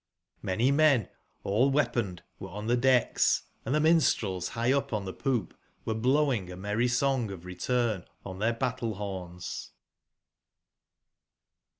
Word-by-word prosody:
)VIany 115 +9 +2
men 140 -8 +4 0.3
all/weapon 120 -2 +1
ed - - -17 0.2
were 95 - -7
on 105 +3 -6
the 120 +2 +2
decks, 125 0 +3 0.2
and 130 +6 -1
the - - +3
minstrels 115 - +2
high 115 +5 0
up 140 -2 -1
on 105 -2 -1
the 95 - -5
poop 130 -5 -2 0.3
were 110 - 0
blowing 125 -4 +1
a 90 - -8
merry 105 +5 0
song 125 -1 +1
of 90 -3 -8
return 110 +1 -1 0.2
on 95 -1 -7
their 115 +3 +2
ba 120 +2 -1
ttle/horns. 95 -6 -5
115 Hz, 135 wpm, -29 LUFS, 95-130 Hz, 0.3 s, men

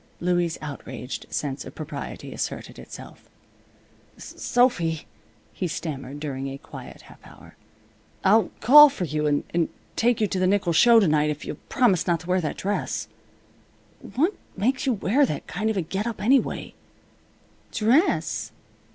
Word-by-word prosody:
Louie's 175 -1 0
outraged 130 -3 -7
sense 140 -2 -3
of - - -11
propriety 155 0 -7
asserted - - -5
itself. - - -12 0.9
"Sophy," 180 - 0 0.5
he 185 - -2
stammered, 145 -4 -5
during 135 -2 -4
a 135 0 -6
quiet 160 +3 -11
half - - -16
hour, - - -15 0.7
"I'll 210 +3 +4
call 295 +6 +10
for 270 -9 -5
you 150 -2 -1
and 160 +3 0 0.3
take 240 0 +2
you 215 - +3
to 190 -2 -2
the 185 - +2
nickel 190 -3 +2
show 235 +7 +7
to 200 - +3
night 150 0 +2
if 150 -1 -4
you'll - - -5
promise 220 - +2
not 170 -2 +1
to 175 - -12
wear 185 0 +2
that 155 - -3
dress. 205 +2 -2 1.1
What 330 +10 +2 0.2
makes 255 +7 0
you 260 - +3
wear 225 +7 +2
that - - -1
kind 220 +2 -2
of 220 - -1
a 185 - 0
get 195 +7 -3
up, 230 - -4
anyway?" 260 +6 +1 1.0
"Dress?" 250 - +1
185 Hz, 150 wpm, -25 LUFS, 155-230 Hz, 1.1 s, call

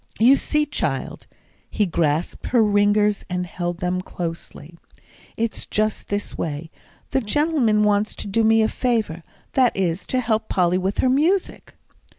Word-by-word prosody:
"You 245 +5 +6
see, 300 +2 0
child," 295 - -3 0.4
he 210 - +1
grasped 165 -2 -1
her 220 -4 +3
fingers 205 0 +3
and 180 0 -2
held 175 0 -4
them 180 0 -1
closely, 170 -2 -7 0.6
"it's 230 0 -2
just 215 0 -1
this 205 0 -3
way: 160 +1 -4 0.4
the 265 - +1
gentleman 240 -3 +2
wants 210 0 +1
to - - -6
do 225 +3 +1
me 225 0 +4
a - - +3
favour; 220 -10 -1 0.3
that 255 -5 +2
is, 180 -1 -1
to 255 - 0
help 225 -3 -1
Polly 180 -1 +2
with 190 +2 -2
her - - +4
music." 325 +9 0
210 Hz, 155 wpm, -22 LUFS, 180-235 Hz, 0.6 s, You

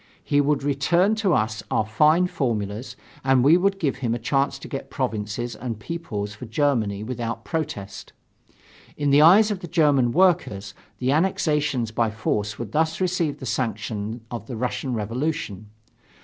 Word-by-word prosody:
He 145 0 +2
would 145 -1 +1
return 165 +8 +2
to 200 -5 +2
us 110 0 0
our 110 - +1
fine 155 +11 +4
formulas 115 - -3 0.3
and 130 -1 +4
we 145 +4 +6
should 195 +3 +3
give 145 -9 -1
him 120 -3 -1
a - - -2
chance 135 +4 0
to - - -10
get 135 - -6
provinces 120 -2 -3
and 115 -4 -5
peoples 105 -8 -5
for 110 +3 -9
Germany 110 -5 0
without 120 -1 -3
a - - -26
protest. 150 - -5 0.9
In 145 -1 +1
the 145 +2 +6
eyes 205 +7 +7
of 200 - -2
the 175 - -7
German 145 -7 +3
workers, 115 - +2 0.2
the 130 +1 0
annexations 150 - +1
by 115 0 +1
force 105 -1 -2
would 115 -3 -6
thus 160 +3 0
receive 175 -5 0
the - - -7
sanction 110 -1 -3
of 115 -2 -6
the 120 - -5
Russian 125 +1 -2
Revolution. 110 - -3
130 Hz, 165 wpm, -24 LUFS, 110-155 Hz, 0.9 s, eyes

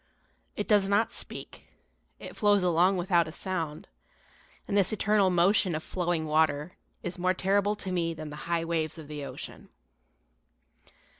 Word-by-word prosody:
It 205 - -3
does 205 -2 +4
not 220 +3 +2
speak, - - -8 0.5
it - - -10
flows 205 -2 +3
along 180 +2 +3
without 175 -2 +2
a - - -6
sound; 165 -4 -4 0.8
and - - -2
this 195 -2 +4
eternal 210 -2 +3
motion 180 0 +3
of 155 - -4
flowing 175 -3 -1
water 155 +1 +1 0.3
is 180 - -5
more 185 +1 +2
terrible 200 +2 +1
to 195 -3 -6
me 165 -2 -1
than 155 -1 -7
the - - -7
high 170 -1 +1
waves 160 -2 -1
of 155 -3 -9
the 150 -1 -6
ocean. - - -8
175 Hz, 155 wpm, -28 LUFS, 160-195 Hz, 0.8 s, does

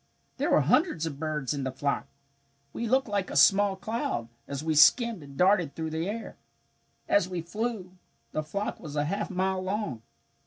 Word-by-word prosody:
"There - - 0
were - - +5
hundreds 295 - +2
of 145 -4 -5
birds 150 -4 -2
in 140 -2 -3
the 130 - -2
flock. 140 +2 -2 0.7
We 235 - -3
looked 265 +1 +3
like 200 -3 -1
a - - -6
small 195 +8 +5
cloud, 190 - -3 0.2
as 140 +1 -4
we 160 0 0
skimmed 215 - +5
and 140 -1 -12
darted 180 -4 +3
through 160 -1 -4
the 160 +4 -2
air. 225 +2 -6 0.7
As 305 - +3
we 180 -2 -3
flew, 190 -1 -4 0.3
the 155 - -1
flock 200 +7 -4
was 150 -3 -8
a 145 0 +1
half 200 +6 -2
mile 190 0 0
long. 185 - -3
180 Hz, 185 wpm, -28 LUFS, 150-205 Hz, 0.7 s, were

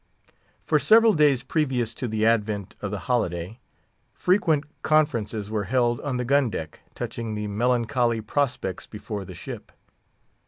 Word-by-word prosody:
For - - +2
several 225 0 +6
days 145 -6 +3
previous 130 -6 0
to 125 - -4
the 110 -1 0
advent 105 -3 0
of 100 - -3
the 100 0 -4
holiday, 100 -3 -1 0.5
frequent 165 -6 +2 0.2
conferences 115 -9 +1
were 105 -2 -1
held 120 +1 +1
on 135 -3 -2
the 125 - -2
gun 140 0 +3
deck 80 -6 -6 0.2
touching 115 -2 -4
the 105 0 -3
melancholy 120 +2 +1
prospects 120 -5 -2
before 105 -2 -6
the - - -10
ship. - - -8
120 Hz, 145 wpm, -25 LUFS, 105-135 Hz, 0.5 s, several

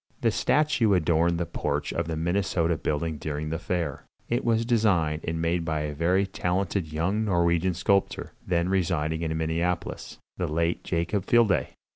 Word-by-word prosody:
This - - +2
statue 135 -9 +3
adorned 85 0 +2
the 85 - -1
porch 85 - -2
of 85 -1 -2
the 80 - -2
Minnesota 85 0 0
building 75 0 -2
during 75 +1 -4
the 80 - -2
fair. 85 -6 -3 0.2
It 120 +2 0
was 115 -1 +2
designed 95 -10 +2
and 80 0 -1
made 85 +1 0
by 80 -2 -1
a 75 0 -3
very 90 +6 +2
talented 90 -2 -1
young 95 +8 0
Norwegian 85 -2 +2
sculptor, 100 +3 0
then 85 -1 0
residing 80 -4 0
in 80 -1 -1
Minneapolis 85 +2 -2 0.2
the - - -1
late 85 +2 0
Jakob 90 +3 -1
Fjelde. 105 - +4
85 Hz, 160 wpm, -26 LUFS, 80-95 Hz, 0.2 s, Fjelde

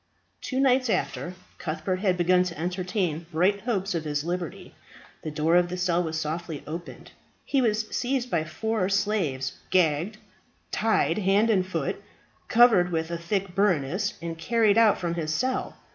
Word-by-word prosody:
Two 260 - -2
nights 260 -2 +3
after 180 -2 -2 0.2
Cuthbert 160 +3 -2
had 185 -2 +1
begun 180 +1 +4
to 175 -2 -6
entertain 180 -2 -2
bright 185 +5 +2
hopes 200 -4 -1
of 165 -2 -2
his 145 -1 -2
liberty, 175 -1 -5 0.5
the 155 - -4
door 155 +3 +1
of 175 0 +4
the 180 - -4
cell 180 -1 +1
was 160 -2 -2
softly 160 -1 -4
opened. 165 +3 -8 0.3
He 275 - +1
was 215 -2 +1
seized 250 0 -1
by 165 -2 +1
four 200 +4 -1
slaves, 195 -10 -1
gagged, 180 +3 +2 0.5
tied 220 0 +1
hand 205 +3 +3
and 190 -4 +3
foot, 185 - -3 0.5
covered 225 -7 +5
with 160 0 -2
a 170 - -2
thick 185 +2 -2
burnous, 190 0 +1
and 165 -1 -5
carried 220 +3 +3
out 225 -2 +5
from 170 -2 -2
his 160 -2 -2
cell. 255 +10 -1
180 Hz, 160 wpm, -26 LUFS, 165-210 Hz, 0.5 s, covered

